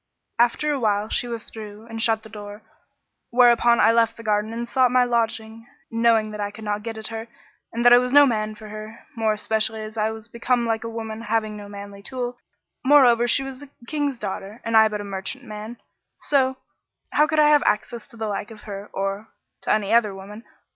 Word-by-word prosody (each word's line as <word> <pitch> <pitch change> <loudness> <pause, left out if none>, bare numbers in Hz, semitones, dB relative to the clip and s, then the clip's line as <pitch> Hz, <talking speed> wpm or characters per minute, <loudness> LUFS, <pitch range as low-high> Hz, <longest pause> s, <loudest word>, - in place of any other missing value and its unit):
After 270 +6 +2
a 280 - -2
while 210 -2 0
she 245 - 0
withdrew 220 -2 -8
and 225 -1 -5
shut 225 -1 +2
the - - -11
door; 205 0 -9 0.7
whereupon 240 -1 +5
I 225 - +6
left 230 -1 +2
the 230 - -10
garden 210 0 0
and 235 +1 -4
sought 255 0 +3
my 250 +1 +4
lodging, 225 -1 -2 0.2
knowing 230 -2 +3
that 210 - -7
I 205 - -1
could 215 +2 -11
not 210 0 -2
get 225 0 -6
at 220 0 -5
her 225 0 -6 0.4
and 235 +1 -2
that 240 - +9
I 245 - +9
was 250 0 -1
no 290 +1 +8
man 215 -4 -1
for 215 0 -11
her, 215 +1 -9
more 220 -2 +1
especially 220 +1 -1
as 215 +1 -9
I 215 +1 +2
was 220 0 -8
become 235 +1 0
like 225 0 -1
a 230 - -4
woman, 225 -1 -6
having 220 -1 -1
no 205 -1 -9
manly 200 0 -9
tool: 245 +2 -5 0.4
moreover 250 -4 +6
she 270 +3 +2
was 270 0 -8
a 285 - -11 0.2
King's 290 -1 -2
daughter 205 +1 -6
and 230 0 0
I 220 0 +8
but 210 -1 -4
a - - -6
merchant 195 +7 -5
man; 215 +1 -8 0.4
so; 265 -2 +1 0.5
how 300 +1 +4
could 310 0 -1
I 300 0 +6
have 295 -1 +5
access 220 +2 -1
to 230 - -16
the 220 - -3
like 205 0 -3
of 220 -2 -12
her 200 -1 -8
or— 195 +2 -3 0.3
to - - -1
any 215 0 +1
other 215 -4 +3
woman? 205 +4 -10
225 Hz, 215 wpm, -23 LUFS, 215-240 Hz, 0.7 s, that